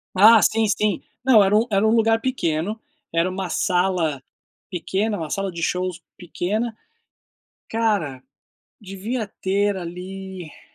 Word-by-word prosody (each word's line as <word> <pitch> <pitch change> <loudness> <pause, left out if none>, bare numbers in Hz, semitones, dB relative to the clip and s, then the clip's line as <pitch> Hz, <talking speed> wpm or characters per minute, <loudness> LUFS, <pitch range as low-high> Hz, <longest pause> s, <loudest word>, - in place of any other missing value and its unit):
Ah 220 +3 +8
sim 225 0 +3
sim, 205 -2 0 0.2
não 235 -6 +6
era 195 +2 +3
um 225 +2 +4
era 200 +2 +3
um - - +3
lugar 225 0 +3
pequeno, 210 - -1 0.3
era 165 +2 +2
uma 185 0 -4
sala 175 -7 0 0.5
pequena, 200 +4 -1
uma 160 -3 -5
sala 195 -1 -2
de 170 0 -7
shows 180 0 -1 0.2
pequena. 210 +6 -3 0.9
Cara, 200 - -1 0.6
devia 210 +3 -4
ter 200 +1 0
ali 185 -1 -8
195 Hz, 130 wpm, -22 LUFS, 175-220 Hz, 0.9 s, Ah